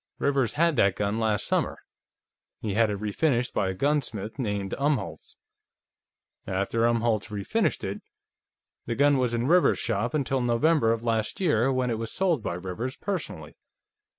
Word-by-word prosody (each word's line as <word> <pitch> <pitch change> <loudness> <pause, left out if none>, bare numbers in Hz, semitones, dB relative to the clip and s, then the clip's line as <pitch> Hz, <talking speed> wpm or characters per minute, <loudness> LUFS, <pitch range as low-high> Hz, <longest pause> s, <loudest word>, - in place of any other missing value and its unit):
"Rivers 135 -4 +1
had 165 0 +2
that 100 -1 +4
gun 105 +2 -1
last 110 -2 0
summer. - - 0 0.8
He 105 -3 -3
had 110 +1 +3
it 100 - -2
refinished 120 +4 0
by 95 - 0
a 95 - -3
gunsmith 135 -4 -1
named 100 -5 -2
Umholtz. 140 - -2 1.1
After 100 +5 +1
Umholtz 115 -2 +1
refinished 100 -2 -1
it, - - -4 0.9
the 115 - -1
gun 140 0 +4
was 125 -2 +1
in 120 +1 -1
Rivers's 175 +5 +4
shop 115 +3 -1
until 135 -2 0
November 120 +1 +3
of 115 0 -1
last 110 -2 -1
year, 135 - +2
when 130 -2 0
it 110 - -2
was 115 0 -4
sold 175 -8 +1
by 85 - -3
Rivers 95 +9 -5
personally. 200 -3 -5
115 Hz, 155 wpm, -27 LUFS, 105-140 Hz, 1.1 s, that